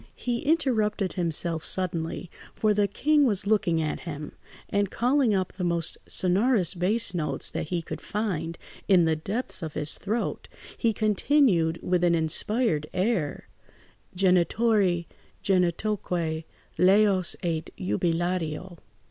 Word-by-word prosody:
He 240 -1 -2
interrupted 220 - +1
himself 165 -1 -1
suddenly, 170 -1 -2 0.2
for 215 -1 +2
the 205 0 +2
king 300 +6 +2
was 205 -4 +1
looking 195 -6 +2
at 155 - -3
him; 150 -3 -7 0.4
and 200 -1 0
calling 245 -1 +2
up 185 -1 -1
the 185 - -5
most 170 -1 0
sonorous 190 0 +2
bass 195 +3 +1
notes 150 -6 0
that - - -4
he 170 0 -2
could - - -7
find 185 -6 -3 0.3
in 185 -4 +5
the 160 -1 +2
depths 195 +5 -4
of 160 -2 -6
his 150 0 0
throat, 220 +4 -3 0.3
he 230 - +1
continued 210 - +2
with 180 -1 +1
an 170 -1 +4
inspired 160 +1 +1
air, 185 -6 -1 0.7
"Genitori 185 0 +2 0.4
genitoque 180 -3 0 0.4
laus 190 0 +4
et 165 -2 -2
jubilatio." 170 - -2
185 Hz, 125 wpm, -26 LUFS, 165-215 Hz, 0.7 s, in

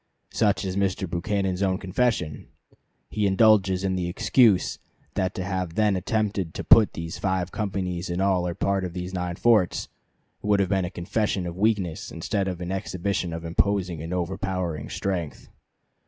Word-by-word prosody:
Such 105 -1 +1
is 95 -1 -3
Mr. 95 -1 0
Buchanan's 95 +2 -1
own 95 -1 +2
confession. 95 -5 -1 0.6
He 105 -2 +1
indulges 95 -2 +4
in 95 -1 0
the 90 -1 -1
excuse 105 +2 +3 0.3
that 95 0 -1
to 95 - -3
have 90 -3 -3
then 105 -2 +3
attempted 100 -2 -1
to - - -4
put 110 -2 +6
these 85 0 -6
five 95 -2 -1
companies 95 -4 -3
in 85 +1 -2
all 95 -2 +2
or 85 - -3
part 100 0 0
of 90 -2 -4
these 90 +1 -5
nine 90 -1 -2
forts 105 -4 +2 0.5
"would 105 -1 +2
have 95 - +1
been 95 -2 +1
a - - -3
confession 95 +2 -1
of 85 -1 -5
weakness 100 -5 0
instead 95 +4 -2
of 90 -2 -4
an 90 +1 -4
exhibition 95 -1 -2
of 80 0 -5
imposing 90 -1 0
and 80 +2 -6
overpowering 90 -4 -2
strength." 90 -6 -3
95 Hz, 170 wpm, -25 LUFS, 90-100 Hz, 0.6 s, put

